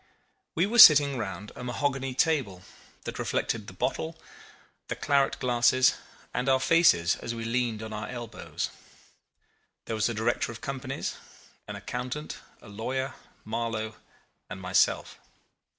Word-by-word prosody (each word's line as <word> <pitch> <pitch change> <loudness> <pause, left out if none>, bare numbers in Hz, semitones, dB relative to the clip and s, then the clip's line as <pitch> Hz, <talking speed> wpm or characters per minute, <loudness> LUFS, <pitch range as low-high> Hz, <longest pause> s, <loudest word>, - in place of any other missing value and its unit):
We 170 - +3
were 235 +4 0
sitting 145 - +9
round 100 -1 -5
a - - -8
mahogany 130 +1 -2
table 125 - 0 0.4
that - - -6
reflected 110 -3 -2
the - - -9
bottle, 160 +5 -3 0.7
the - - -3
claret 140 -1 +1
glasses, 125 +1 +3 0.4
and 125 +2 -1
our 130 0 +4
faces 130 - +4
as 120 - -5
we 115 0 -5
leaned 115 -2 -1
on 110 0 -7
our 105 0 -5
elbows. 120 -3 -5 1.1
There 115 - -3
was 110 +2 +1
a 115 - -3
director 115 +2 0
of 115 - -9
companies, 135 -2 -4 0.5
an - - -6
accountant, 125 +5 -5 0.3
a - - -13
lawyer, 130 +6 -3 0.3
Marlow, 110 -1 -3 0.5
and - - -7
myself. - - +1
125 Hz, 135 wpm, -28 LUFS, 110-135 Hz, 1.1 s, sitting